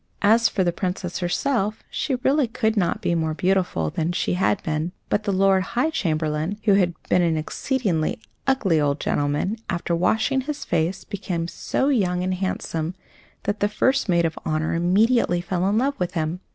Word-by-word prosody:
As 225 +3 +5
for 190 - 0
the 175 - +2
Princess 180 0 -3
herself, 210 +4 -1
she 270 - -1
really 280 -1 +3
could 220 -1 0
not 180 -5 0
be - - +1
more 160 -2 0
beautiful 180 - 0
than 165 +2 -1
she - - 0
had 190 +2 +1
been; 155 +2 -2 0.2
but 205 - 0
the 200 - +1
Lord 195 0 +3
High 245 +11 0
Chamberlain, 155 - -1
who 205 - +4
had 180 -3 +2
been 180 - +3
an 165 -2 +2
exceedingly 170 - -1 0.3
ugly 195 - +2
old 145 0 +1
gentleman, 145 +9 0
after 175 -2 -1
washing 220 +10 +1
his 295 +2 -5
face, 170 +3 0
became 180 -5 -3
so 265 +9 -1
young 180 -9 +1
and 185 0 0
handsome 180 -3 -3 0.5
that 205 +1 -2
the 205 - +2
First 260 +1 +1
Maid 170 -1 +3
of 160 - -2
Honour 155 0 -1
immediately 185 +3 +3
fell 180 +1 -1
in 210 - +1
love 275 +4 0
with 180 -1 -2
him. 160 +2 -1
185 Hz, 180 wpm, -23 LUFS, 165-215 Hz, 0.5 s, As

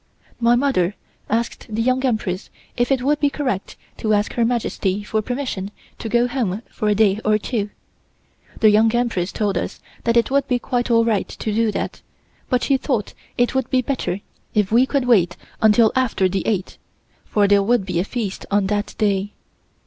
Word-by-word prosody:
My 235 0 +4
mother 240 -8 +1 0.3
asked 230 +1 -2
the 215 +1 -3
Young 255 +3 +1
Empress 215 -7 -1 0.3
if 245 +2 0
it 260 -2 +2
would 295 +2 +2
be 290 - +3
correct 255 -9 -3 0.2
to 215 -1 +1
ask 205 +1 0
Her 235 - +1
Majesty 215 -4 -1
for 215 +1 -1
permission 245 -5 -3 0.3
to 225 - -4
go 240 +2 +3
home 235 -5 -2
for 215 - -2
a 210 - +3
day 210 -1 +3
or 215 0 +3
two. 210 -1 -2 0.9
The 215 -1 +7
Young 220 +2 +4
Empress 225 -7 0
told 200 -4 0
us - - -5 0.3
that 230 0 +3
it 235 +2 +2
would 280 0 +2
be 250 - +2
quite 245 0 -2
all 230 -1 +4
right 220 -4 +1
to 215 - -4
do 225 0 +2
that, - - -4 0.5
but 250 -2 +1
she 275 - +3
thought 250 -6 -2 0.2
it 245 0 +2
would 265 -2 -1
be 255 -1 +2
better 235 -7 -2 0.3
if 210 -2 +2
we 245 +3 +5
could 275 -3 0
wait 190 -8 +3 0.2
until 220 +1 +5
after 240 -7 +2
the 190 +1 -2
eighth, 195 -4 -2 0.4
for 205 -1 +2
there 200 0 +5
would 220 0 +2
be 180 -3 -1
a - - +2
feast 210 -2 -4
on 205 -1 +2
that 205 +1 -2
day. 205 -1 0
225 Hz, 195 wpm, -21 LUFS, 205-245 Hz, 0.9 s, The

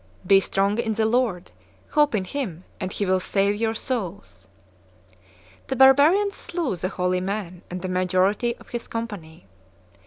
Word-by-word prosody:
Be 195 +1 +6
strong 195 +3 0
in 225 -2 0
the 220 0 +1
Lord: 220 -6 0 0.4
hope 295 -5 +3
in 195 - 0
Him, 185 - -4 0.2
and 185 -2 -3
He 205 - -2
will 185 0 +2
save 200 +2 +1
your 225 0 0
souls." 175 - -5 1.2
The 265 - -2
barbarians 290 +10 +5
slew 335 - -3
the 180 +2 -3
holy 180 0 -1
man 185 -2 -4
and 180 0 -6
the - - -2
majority 185 +6 +1
of - - -18
his 240 -1 -5
company. 200 - -6
200 Hz, 155 wpm, -24 LUFS, 185-240 Hz, 1.2 s, Be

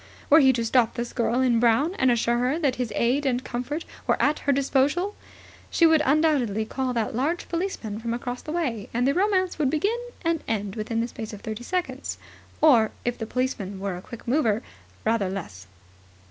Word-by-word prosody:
Were 310 - +9
he 265 -3 +6
to 230 -1 -1
stop 235 0 +2
this 240 -1 -4
girl 240 +1 +1
in 245 -3 +3
brown 245 +9 +3
and 260 - +4
assure 235 0 +2
her 255 +5 +1
that 285 -6 0
his 245 -3 -2
aid 255 +5 +2
and 255 -2 0
comfort 260 +6 -4 0.2
were - - +2
at 300 - +2
her 285 - +1
disposal, 280 +8 +1 0.6
she 335 - +4
would 320 -1 +5
undoubtedly 270 -8 +2
call 260 +3 -2
that 225 -2 -1
large 305 +8 -1
policeman 335 - -3
from 230 0 -3
across 245 +1 -4
the 305 - -7
way, 255 -12 -2
and 245 +2 +2
the 275 - +3
romance 370 -1 +1
would 285 -4 +2
begin 400 - 0 0.2
and 330 -1 0
end 205 -3 -2
within 225 +1 -2
the 235 - -1
space 225 -2 -7
of 205 - -9
thirty 220 +1 -5
seconds, 365 +6 -3 0.4
or, 240 -8 +6 0.2
if 245 0 -1
the 225 - -4
policeman 225 -6 -2
were 195 -1 -3
a 180 - -7
quick 235 +5 -11
mover, 230 -5 +2 0.4
rather 220 -4 +1
less. 100 - -7
250 Hz, 200 wpm, -25 LUFS, 225-300 Hz, 0.6 s, Were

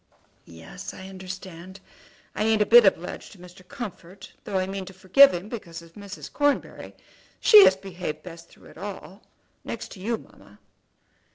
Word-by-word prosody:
"Yes, 80 -7 -10
I 190 0 -10
understand. 185 -1 -9 0.5
I - - -2
ain't 220 -1 +2
a - - -6
bit 235 0 +7
obliged 180 -2 -2
to - - -17
Mr. 180 +1 -15
Comfort, 195 -5 -9
though 195 - -2
I 185 - 0
mean 195 0 -5
to 190 - -11
forgive 190 +10 +6
him 180 +3 -5
because 170 -8 -8
of 165 0 -18
Mrs. 195 -7 -10
Cornbury. 290 -1 -1 0.4
She 425 -2 +9
has 190 - +5
behaved 180 -5 -7
best 170 -1 -12
through - - -18
it - - -15
all, 195 0 -8 0.4
next - - -7
to 195 - -11
you, 225 +4 -2
mamma." 100 - -19
190 Hz, 170 wpm, -25 LUFS, 175-205 Hz, 0.5 s, She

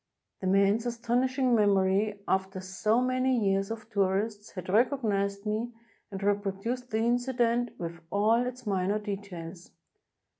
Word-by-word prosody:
The 190 - -3
man's 200 +4 +3
astonishing 245 +2 +1
memory, 200 -1 +2
after 190 0 0
so 210 +5 0
many 255 0 +1
years 195 -2 +1
of 220 -1 -6
tourists, 205 +1 0
had 185 - -7
recognized 205 -3 +1
me 220 +3 -2 0.4
and 195 - -6
repro 200 -1 0
duced 245 +4 -3
the 220 - -1
incident 240 0 +1
with 170 0 -5
all 225 +4 +3
its 250 0 -7
minor 195 0 +1
details. 190 -5 -7
210 Hz, 135 wpm, -29 LUFS, 195-240 Hz, 0.4 s, man's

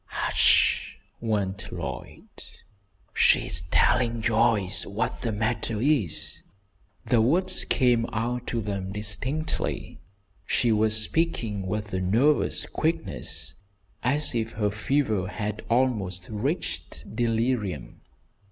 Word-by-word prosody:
"Hush!" - - +2 0.2
warned 100 -4 -2
Lloyd. - - -6 0.9
"She's - - +4
telling 120 -2 +2
Joyce 110 -4 +2
what 110 +5 -3
the 115 - -1
matter 110 0 -1
is." 125 - +1 0.6
The 120 -3 +3
words 185 +10 +2
came 120 -3 +2
out 120 +2 -2
to 115 - -1
them 100 -2 -4
distinctly. 130 +10 -3 0.5
She 120 - +2
was 110 0 +3
speaking 110 - -1
with 105 +1 -4
a 95 - -1
nervous 120 +11 +2
quickness 80 - -2 0.5
as 145 +4 +2
if 115 -1 -2
her 105 -2 0
fever 110 -3 0
had 105 +1 -4
almost 105 -7 +1
reached 135 - -4
delirium. 115 -4 -1
115 Hz, 105 wpm, -26 LUFS, 105-125 Hz, 0.9 s, She's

